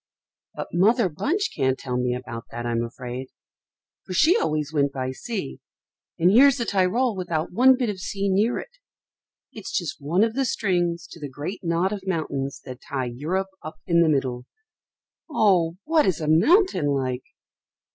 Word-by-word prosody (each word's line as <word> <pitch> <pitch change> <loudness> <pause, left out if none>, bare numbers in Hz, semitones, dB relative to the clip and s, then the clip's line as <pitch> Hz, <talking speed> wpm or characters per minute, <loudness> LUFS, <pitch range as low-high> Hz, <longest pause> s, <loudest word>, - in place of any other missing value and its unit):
But - - -5
Mother 205 +4 +3
Bunch 325 - -1
can't 130 -2 +1
tell 125 -2 -4
me 125 0 0
about 120 -2 -7
that 120 +1 -6
I'm 115 0 0
afraid, 125 +2 -6 0.8
for 185 - -7
she 315 - +5
always 155 - -1
went 140 -2 +2
by 130 -1 -3
sea, 130 - -5 0.6
and 175 +3 +4
here's 270 +5 +6
the 235 - -2
Tyrol 205 +5 +1
without 170 -4 -2
one 255 +5 +6
bit 250 -2 0
of 190 - -8
sea 195 +1 -3
near 205 +5 +2
it. - - -9 0.7
It's 215 -3 -8
just 165 -3 -3
one 170 +8 +2
of 225 0 +1
the 270 +2 0
strings 175 -8 0
to 170 - -11
the 145 -2 -6
great 145 +10 -6
knot 170 +3 +1
of 195 -2 -7
mountains 140 -6 -2
that 130 -1 -9
tie 130 -3 -3
Europe 180 +9 -2
up 155 - -8
in 170 -1 +3
the 165 - +4
middle. 130 -4 -1 0.8
Oh! 180 - +2
what 315 -4 +3
is 180 -4 +1
a 155 - -3
mountain 185 - +4
like?" 130 -3 -1
170 Hz, 175 wpm, -24 LUFS, 135-210 Hz, 0.8 s, here's